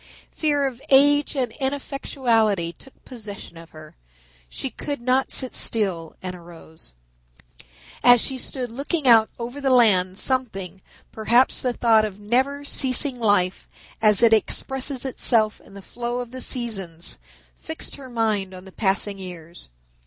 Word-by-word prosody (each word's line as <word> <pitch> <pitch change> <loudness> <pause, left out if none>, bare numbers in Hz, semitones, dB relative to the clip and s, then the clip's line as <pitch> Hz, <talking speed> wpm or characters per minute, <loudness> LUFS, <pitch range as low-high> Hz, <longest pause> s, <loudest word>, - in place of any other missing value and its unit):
Fear 290 -3 0
of 260 -2 -4
age 290 +2 +4
and 250 -4 -1
ineffectuality 240 -9 -1
took 270 - -19
possession 215 -8 -9
of 165 0 -13
her. 155 -1 -14 0.5
She 270 - -5
could 285 -2 -5
not 255 +2 +1
sit 260 -2 +1
still, 190 -7 0
and 185 -1 -5
arose. 165 - -13 1.1
As 245 -1 +7
she 260 +3 -2
stood 250 -2 -4
looking 280 +4 -3
out 225 -2 +6
over 245 +4 -6
the 275 - +1
land 195 -7 +4
something, 200 -8 -2 0.3
perhaps 235 +4 +2
the 250 -1 -1
thought 225 -2 +3
of 205 -2 -5
never 260 +7 0
ceasing 265 -1 +2
life 205 -5 +1 0.3
as 215 0 +4
it 225 -1 +6
expresses 265 +4 0
itself 225 -4 +1
in - - -17
the 200 - -11
flow 240 +3 -5
of 245 -1 -5
the 255 0 -7
seasons, 195 -11 -3 0.4
fixed 320 0 -7
her 265 -2 -11
mind 215 -5 -1
on 185 +1 -12
the 190 - -13
passing 200 0 +1
years. 175 - -9
235 Hz, 145 wpm, -23 LUFS, 195-260 Hz, 1.1 s, As